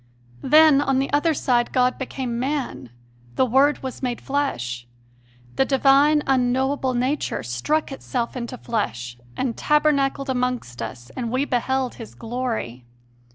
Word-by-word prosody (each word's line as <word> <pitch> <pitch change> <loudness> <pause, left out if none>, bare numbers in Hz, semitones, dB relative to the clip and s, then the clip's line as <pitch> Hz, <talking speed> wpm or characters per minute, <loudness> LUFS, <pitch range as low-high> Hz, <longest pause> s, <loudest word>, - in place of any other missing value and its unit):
Then, 305 -1 +6
on 270 -2 +1
the 270 +1 -1
other 310 +2 +2
side, 240 -3 +1
God 255 0 +2
became 255 -2 -4
man 255 - -3 0.5
"the - - +3
Word 270 +5 +3
was 260 -1 -6
made 245 -3 -2
flesh." 125 - -2 0.7
The - - +5
divine, 280 +2 +4
unknowable 260 +1 +1
Nature 260 +5 -1
struck 120 - -1
itself 250 -3 -3
into 250 0 -5
flesh 120 - -3 0.2
and 245 -3 -1
"tabernacled 280 -2 +1
amongst 250 - -2
us, 120 +2 -7
and 240 -3 -3
we 260 +4 0
beheld 260 0 -1
His 225 - -10
glory." 225 - -4
255 Hz, 135 wpm, -23 LUFS, 235-275 Hz, 0.7 s, Then